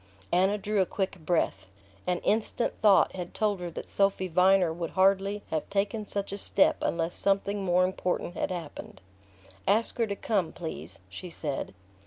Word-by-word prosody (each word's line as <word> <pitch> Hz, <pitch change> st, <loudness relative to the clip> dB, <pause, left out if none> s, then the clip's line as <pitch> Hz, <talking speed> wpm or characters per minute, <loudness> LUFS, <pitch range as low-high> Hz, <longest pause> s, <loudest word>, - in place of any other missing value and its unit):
Anna 190 Hz, +4 st, +3 dB
drew 210 Hz, 0 st, 0 dB
a -, -, +3 dB
quick 195 Hz, -1 st, -3 dB
breath. 155 Hz, -, -1 dB, 0.4 s
An 180 Hz, 0 st, +2 dB
instant's 220 Hz, +2 st, 0 dB
thought 205 Hz, -3 st, +5 dB
had 180 Hz, -2 st, -6 dB
told 210 Hz, -3 st, +1 dB
her 175 Hz, -1 st, -4 dB
that 165 Hz, -, -7 dB
Sophy 195 Hz, -1 st, +1 dB
Viner 180 Hz, 0 st, +4 dB
would 165 Hz, -1 st, -4 dB
hardly 195 Hz, +2 st, +3 dB
have 160 Hz, -1 st, -2 dB
taken 205 Hz, +2 st, -1 dB
such 200 Hz, -1 st, -3 dB
a 200 Hz, -, -3 dB
step 195 Hz, -, +3 dB
unless 170 Hz, 0 st, -1 dB
something 200 Hz, 0 st, 0 dB
more 180 Hz, 0 st, +3 dB
important 185 Hz, -1 st, -2 dB
had -, -, -2 dB
happened. 170 Hz, -5 st, -7 dB, 0.7 s
"Ask 220 Hz, +4 st, +2 dB
her 230 Hz, -, +2 dB
to 200 Hz, -, -2 dB
come, 195 Hz, -6 st, -1 dB
please," 95 Hz, -, -7 dB
she 95 Hz, -, -8 dB
said. 145 Hz, -, -4 dB
190 Hz, 170 wpm, -28 LUFS, 170-200 Hz, 0.7 s, thought